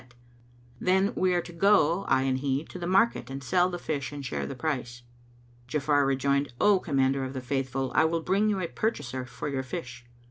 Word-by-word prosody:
[FN#224] - - -21 0.7
Then 190 +4 +2
we 185 0 +2
are 175 - +1
to 175 - -11
go, 195 -1 +3
I 130 - +2
and 130 -1 0
he, 140 +2 -1
to 180 - -9
the 170 - -4
market 195 - +2
and 135 +1 -6
sell 175 +8 +2
the 175 - -4
fish 145 -5 -3
and 145 -1 -7
share 125 - -3
the 135 - -6
price." 125 -4 -3 0.6
Ja'afar 145 +1 +2
rejoined, 140 0 +1
"O 205 -2 +5
Commander 135 -4 +1
of 130 0 -5
the 130 - -3
Faithful, 135 0 -2
I 160 - +4
will 165 +1 0
bring 200 +5 +2
you 200 -2 0
a 175 - -2
purchaser 130 - -3
for 125 +4 -6
your 135 -2 -1
fish." 125 -1 -7
140 Hz, 210 wpm, -28 LUFS, 130-175 Hz, 0.7 s, O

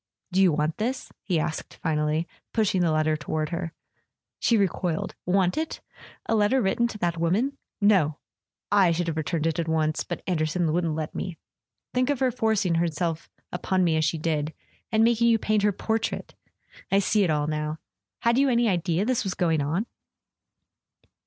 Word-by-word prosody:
"Do 190 +2 +3
you 185 -3 +6
want 150 +1 0
this?" 250 +5 -2
he 175 -5 0
asked 155 +1 -4
finally, 155 0 0 0.3
pushing 205 -4 +2
the 170 -2 +2
letter 155 0 +2
toward 155 0 -2
her. 170 -1 -3 0.7
She 230 - +3
recoiled. 180 -4 -1
"Want 185 - +2
it? 320 0 -3 0.5
A - - 0
letter 215 +4 +3
written 235 +2 +2
to 225 - -7
that 170 -4 -1
woman? 220 +12 0 0.2
No! 190 -8 +3 0.5
I 195 -4 +5
should 175 +1 -1
have 165 -2 -2
returned 160 0 -1
it 165 0 0
at 165 - -1
once—but 160 +2 -1
Anderson 160 -1 0
wouldn't 165 -2 0
let 155 -1 -4
me... 180 -3 -4 0.6
Think 255 +1 +1
of 285 -3 +1
her 260 -1 +2
forcing 220 -6 +1
herself 165 0 -2 0.2
upon 185 +1 0
me 165 -2 +2
as 160 - +2
she 160 +1 +1
did—and 160 +8 -2
making 235 0 +4
you 230 -1 +5
paint 215 -1 +1
her 205 0 +3
portrait! 220 +3 -2 0.6
I 195 - +4
see 200 +1 +3
it 180 - +1
all 150 -1 +1
now. 150 0 -2 0.4
Had 235 +2 +3
you 275 0 +4
any 240 -1 +3
idea 175 -1 +1
this 255 0 +1
was 195 -3 -3
going 165 -4 +1
on?" 165 +9 -1
175 Hz, 175 wpm, -26 LUFS, 160-215 Hz, 0.7 s, you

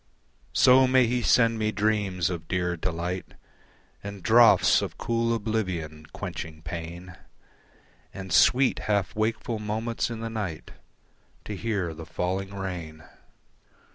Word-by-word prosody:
So 130 +1 +6
may 130 -1 +4
he 120 +1 0
send 115 -1 +3
me 110 0 0
dreams 100 -4 0
of 80 -2 -6
dear 90 -1 -1
delight 90 +2 -4 0.7
And 100 -2 -8
draughts 115 0 +6
of - - -5
cool 115 0 0
oblivion, 90 -9 -3
quenching 80 -1 -7
pain, 85 +2 -7 1.0
And 95 -3 -7
sweet, 130 +8 +4
half 100 -2 0
wakeful 110 +1 -1
moments 110 +3 -2
in 115 -1 -6
the 115 - -4
night 100 -8 -5 0.7
To 105 - -5
hear 100 -5 -2
the 80 0 -10
falling 95 +2 -3
rain. 90 -5 -6
100 Hz, 125 wpm, -26 LUFS, 85-115 Hz, 1.0 s, So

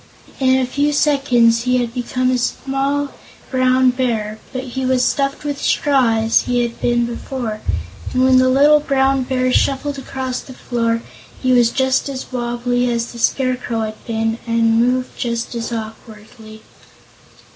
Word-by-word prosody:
In 260 -1 +3
a 260 - +1
few 285 +3 0
seconds 250 -6 +3
he 250 0 +2
had 240 -2 -2
become 255 +1 -1
a 255 - +2
small 275 +3 -1 0.4
Brown 255 0 +3
Bear, 225 -4 -2
but 260 -1 -4
he 265 +1 -5
was 255 -1 +2
stuffed 275 +2 -1
with 290 -1 -4
straw 265 -6 +2
as 225 +1 +3
he 245 -1 +1
had 235 -1 -5
been 240 0 +2
before, 235 -2 -5 0.5
and 255 0 +1
when 260 0 +5
the 255 0 +4
little 290 +3 +5
Brown 270 -2 +1
Bear 255 0 0
shuffled 280 +1 0
across 260 -1 -4
the 260 - -11
floor 230 -2 -1 0.4
he 255 - +2
was 240 -2 +5
just 265 +2 0
as 265 -1 -6
wobbly 245 0 -1
as 235 0 -2
the 235 - -10
Scarecrow 250 -2 0
had 215 0 -6
been 225 0 -1
and 230 0 +2
moved 250 +1 -1
just 235 0 -2
as 235 0 -4
awkwardly. 220 0 -9
250 Hz, 160 wpm, -18 LUFS, 235-265 Hz, 0.5 s, when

